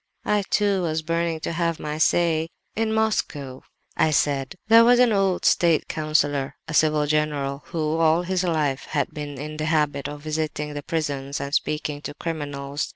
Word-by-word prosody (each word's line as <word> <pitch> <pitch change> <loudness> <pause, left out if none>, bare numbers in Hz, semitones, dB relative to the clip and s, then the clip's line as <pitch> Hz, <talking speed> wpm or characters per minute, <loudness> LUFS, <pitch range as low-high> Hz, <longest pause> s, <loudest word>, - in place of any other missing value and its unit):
"I, 210 0 +2
too, 200 -2 +2
was 160 -2 -1
burning 165 0 -1
to - - -3
have 170 -1 -1
my 150 0 -4
say! 165 0 +2 0.3
"'In 220 0 0
Moscow,' 150 -12 -1 0.3
I 160 - +3
said, 140 -1 0
'there 225 +1 +8
was 245 +1 +6
an 245 -2 +4
old 195 -2 +1
state 170 -3 +3
counsellor, 145 -3 0
a 160 - -5
civil 155 -1 +3
general, 145 -2 -1
who, 155 -1 -1
all 165 +1 +3
his 185 +1 -1
life, 150 -6 0
had 145 -3 -2
been 145 -2 -6
in 150 +3 -6
the 155 - -2
habit 150 -3 0
of 145 0 -7
visiting 155 -1 -3
the 145 - -5
prisons 140 -3 -3
and 140 0 -5
speaking 150 -1 -1
to 145 - -7
criminals. 145 -3 -4
155 Hz, 175 wpm, -24 LUFS, 145-170 Hz, 0.3 s, there